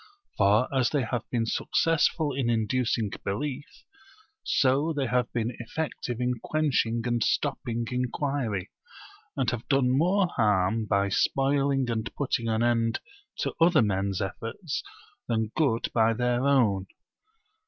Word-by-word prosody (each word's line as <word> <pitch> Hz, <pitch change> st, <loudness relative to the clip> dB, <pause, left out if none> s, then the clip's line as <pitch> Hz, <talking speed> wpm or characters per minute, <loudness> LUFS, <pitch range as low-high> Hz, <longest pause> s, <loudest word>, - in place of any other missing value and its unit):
For 105 Hz, +5 st, +3 dB
as 130 Hz, -2 st, +3 dB
they 145 Hz, -4 st, 0 dB
have 120 Hz, 0 st, -3 dB
been 115 Hz, -2 st, 0 dB
successful 155 Hz, +3 st, +1 dB
in 130 Hz, -3 st, -1 dB
inducing 115 Hz, -1 st, 0 dB
belief, 140 Hz, +7 st, -4 dB, 0.6 s
so 140 Hz, +5 st, +2 dB
they 140 Hz, -3 st, -1 dB
have 125 Hz, -1 st, 0 dB
been 115 Hz, 0 st, -2 dB
effective 120 Hz, -1 st, -4 dB
in 125 Hz, -1 st, -1 dB
quenching 130 Hz, -7 st, 0 dB
and 120 Hz, -2 st, +1 dB
stopping 115 Hz, 0 st, -1 dB
inquiry; 125 Hz, -5 st, -2 dB, 0.7 s
and -, -, 0 dB
have 120 Hz, -2 st, -5 dB
done 130 Hz, -2 st, +3 dB
more 185 Hz, +7 st, +3 dB
harm 105 Hz, -, +1 dB
by 100 Hz, 0 st, +1 dB
spoiling 135 Hz, +4 st, +1 dB
and 110 Hz, -1 st, -2 dB
putting 125 Hz, -4 st, -1 dB
an 110 Hz, +1 st, +1 dB
end 115 Hz, -1 st, +1 dB, 0.4 s
to -, -, -1 dB
other 170 Hz, -6 st, +5 dB
men's 100 Hz, -1 st, -1 dB
efforts 115 Hz, -, -4 dB, 0.5 s
than 110 Hz, -2 st, -1 dB
good 135 Hz, -8 st, +1 dB
by 115 Hz, -1 st, +3 dB
their 125 Hz, +3 st, +1 dB
own. 105 Hz, -9 st, +2 dB
120 Hz, 130 wpm, -27 LUFS, 110-135 Hz, 0.7 s, other